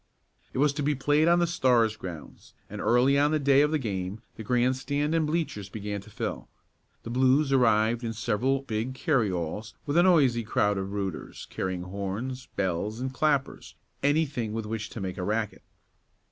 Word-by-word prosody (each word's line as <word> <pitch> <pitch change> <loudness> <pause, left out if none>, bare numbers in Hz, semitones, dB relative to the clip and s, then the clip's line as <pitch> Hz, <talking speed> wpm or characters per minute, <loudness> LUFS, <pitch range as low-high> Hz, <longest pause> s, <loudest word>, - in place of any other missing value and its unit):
It - - -7
was 145 +1 +3
to 150 - -3
be 145 +1 +1
played 145 +4 +2
on 170 +1 +5
the 175 - +3
Stars' 125 -9 +2
grounds, 90 -7 -10 0.2
and - - -5
early 130 +4 +4
on 145 +1 +4
the 155 - +2
day 140 -1 +4
of 150 - +3
the 155 - +1
game 100 -4 -4
the - - -8
grandstand 130 +6 0
and 160 -2 +2
bleachers 150 - -2
began 105 0 -5
to 100 - -15
fill. - - -5 0.5
The 115 - -6
Blues 130 +3 +3
arrived 115 -2 +3
in 115 - -2
several 120 +5 0
big 115 +1 -3
carryalls 105 - -1
with 145 +2 0
a - - +7
noisy 145 -10 +4
crowd 105 -2 +1
of 95 0 -4
"rooters" 100 -4 -5
carrying 95 -1 -3
horns, 100 +8 -5
bells 100 +3 -1
and 130 +1 -3
clappers 140 -2 -1 0.3
anything 140 -6 0
with 110 -1 -3
which 110 0 -4
to 115 - -7
make 95 0 -4
a - - -2
racket. 110 +2 -2
120 Hz, 180 wpm, -27 LUFS, 105-140 Hz, 0.5 s, a